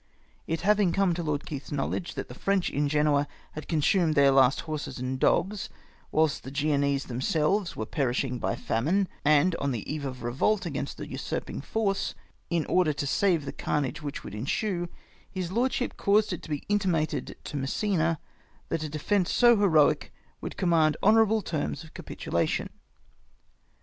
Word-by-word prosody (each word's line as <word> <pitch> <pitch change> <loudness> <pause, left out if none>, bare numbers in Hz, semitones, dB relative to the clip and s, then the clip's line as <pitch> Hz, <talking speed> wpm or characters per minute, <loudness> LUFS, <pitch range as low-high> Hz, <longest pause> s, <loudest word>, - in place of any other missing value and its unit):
It 165 0 -1
liavino; 200 -2 +3
come 195 -3 +3
to 170 - -3
Lord 150 -3 -2
Keith's 140 -2 -7
knowledge 145 +5 -2
that - - -4
the - - -9
French 195 -2 0
in 145 0 0
Genoa 150 -1 +2 0.2
had 155 - -8
consumed 160 +1 +2
their 140 -1 +6
last 135 0 +4
liorses 155 -2 -4
and 130 +1 -3
dogs, 195 +7 +1 0.4
whilst 155 -1 +2
the - - -7
Genoese 140 -1 +1
themselves 155 - 0
were 110 - -3
perishing 125 -1 -1
by - - -1
famine, 170 - 0 0.2
and 155 +4 +4
on 140 - -1
the 120 -6 -3
eve 150 -1 -3
of 130 -3 -5
revolt 140 - +1
against - - -4
the - - -6
usurping - - -4
force 205 -3 -1 0.2
— - - -39
in 170 -2 0
order 180 -5 +2
to 145 - -3
save 170 +1 +2
the - - -4
carnage 150 +2 -2
which 145 -1 -5
would - - -8
ensue, 175 - -2 0.4
his 185 -3 -4
lordship 250 +3 0
caused 205 0 +3
it 180 - -5
to - - -11
be 150 -2 -2
mtimatcd 185 -7 0
to - - -7
Massena 165 +4 0 0.5
that 165 - -1
a 155 - -3
defence 175 +5 0
so 240 -1 +6
heroic 165 -8 +3 0.3
would - - -6
command 165 -4 +3
honourable 220 0 +4
terms 145 -3 -3
of 160 - -15
capitulation. - - -2
155 Hz, 170 wpm, -28 LUFS, 140-190 Hz, 0.5 s, their